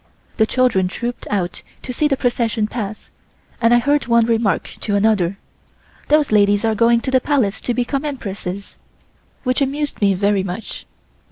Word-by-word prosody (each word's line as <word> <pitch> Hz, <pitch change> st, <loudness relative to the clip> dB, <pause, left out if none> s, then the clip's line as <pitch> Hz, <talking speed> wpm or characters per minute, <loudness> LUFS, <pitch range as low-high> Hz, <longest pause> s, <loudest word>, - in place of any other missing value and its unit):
The 220 Hz, -, +3 dB
children 235 Hz, -8 st, +2 dB
trouped 240 Hz, +6 st, -5 dB
out 185 Hz, -4 st, -2 dB, 0.2 s
to 250 Hz, -, -5 dB
see 300 Hz, +5 st, +2 dB
the 275 Hz, -2 st, 0 dB
procession 235 Hz, -4 st, 0 dB
pass, 215 Hz, -1 st, -6 dB, 0.5 s
and 230 Hz, 0 st, +4 dB
I 240 Hz, -, +6 dB
heard 285 Hz, +4 st, +1 dB
one 235 Hz, -1 st, +4 dB
remark 225 Hz, -5 st, +1 dB, 0.2 s
to 205 Hz, -, -1 dB
another: 200 Hz, -3 st, +2 dB, 0.7 s
"Those 300 Hz, -3 st, +3 dB
ladies 205 Hz, 0 st, +3 dB
are 225 Hz, -, +2 dB
going 235 Hz, +2 st, +3 dB
to 260 Hz, -, -3 dB
the 260 Hz, -1 st, +3 dB
Palace 245 Hz, -9 st, 0 dB
to 245 Hz, -, -1 dB
become 270 Hz, +3 st, -1 dB
Empresses," 200 Hz, -9 st, -5 dB, 0.7 s
which 255 Hz, +1 st, 0 dB
amused 285 Hz, 0 st, -2 dB
me 200 Hz, -1 st, +3 dB
very 200 Hz, +1 st, +2 dB
much. 190 Hz, +3 st, -6 dB
230 Hz, 165 wpm, -19 LUFS, 200-255 Hz, 0.7 s, I